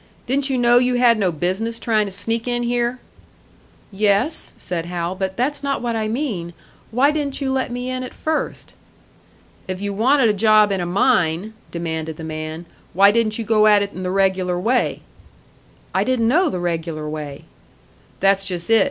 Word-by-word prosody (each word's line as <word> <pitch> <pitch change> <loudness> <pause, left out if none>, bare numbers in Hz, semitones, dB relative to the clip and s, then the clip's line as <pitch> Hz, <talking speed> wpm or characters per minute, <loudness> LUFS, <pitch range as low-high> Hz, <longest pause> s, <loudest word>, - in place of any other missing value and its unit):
Didn't 275 +2 0
you 265 - 0
know 240 0 +5
you 250 0 +1
had 240 -2 +4
no 190 -3 +2
business 185 +8 -2
trying 215 -3 +1
to - - -6
sneak 225 +4 -2
in 240 0 0
here?" 240 +1 0 0.9
"Yes," 210 +8 +1
said 170 -2 -4
Hal; 175 0 -3
"but 190 0 -4
that's 275 +5 -1
not 280 -1 -1
what 235 -1 -2
I 220 -1 -1
mean. 215 - -3 0.4
Why 260 +6 +3
didn't 290 -2 -2
you 270 -2 -1
let 260 -2 -1
me 245 +1 -4
in 255 0 -3
at 255 - -7
first?" 315 0 -3 0.9
"If 185 -1 -4
you 200 0 -3
wanted 250 +5 +3
a 215 - +3
job 215 0 +4
in 195 -2 0
a 175 - -2
mine," 185 -1 +1 0.2
demanded 160 -2 -4
the 160 - -8
man, 155 +1 -6 0.3
"why 200 +2 +7
didn't 215 -1 +1
you 230 - -4
go 215 0 +4
at 205 -1 +5
it 200 - -6
in 185 - -7
the 180 - -2
regular 190 -2 +1
way?" 240 +6 0 0.9
"I - - +2
didn't 255 -3 +1
know 330 +8 +3
the - - -3
regular 165 -3 -3
way." 150 -2 -6 0.8
"That's 195 0 +3
just 180 0 -4
it. 225 - +7
215 Hz, 185 wpm, -20 LUFS, 180-245 Hz, 0.9 s, why